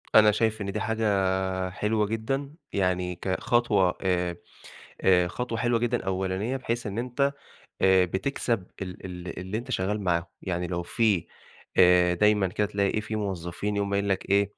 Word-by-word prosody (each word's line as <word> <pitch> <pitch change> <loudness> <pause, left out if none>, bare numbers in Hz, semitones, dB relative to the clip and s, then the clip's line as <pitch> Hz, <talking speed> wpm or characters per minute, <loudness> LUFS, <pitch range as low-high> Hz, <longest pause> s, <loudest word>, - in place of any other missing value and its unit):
أنا 105 -1 +8
شايف 110 0 0
إن 100 -1 -2
دي - - -2
حاجة 95 -4 0
حلوة 105 +3 0
جدًا 135 +6 -2 0.2
يعني 90 -2 0
كخطوة 95 +1 +1
آآ، 90 -2 0 0.7
آآ، 90 -2 +4
خطوة 115 +4 -3
حلوة 120 0 +2
جدًا 120 -1 -1
أولانية 95 +6 -1
بحيث 120 -3 -3
إن 105 +1 -4
أنت 125 +3 0 0.5
آآ، 95 -1 +6
بتكسب 95 +2 -1 0.2
ال 90 -1 -7
ال 90 -1 -7
اللي 95 +4 -3
أنت 125 +3 -8
شغال 105 -1 -1
معاهم، 85 -3 +1 0.2
يعني 90 -2 -2
لو 85 0 -2
في 100 0 +1 0.5
آآ، 90 -1 +6
دايمًا 105 +1 +3
كده 105 +3 0
تلاقي 100 +1 0
في 110 +1 -4
موظفين 100 0 -3
يقوم 100 0 -1
قايل 100 0 +1
لك 95 0 -1
إيه 100 0 +3
100 Hz, 160 wpm, -27 LUFS, 90-110 Hz, 0.7 s, أنا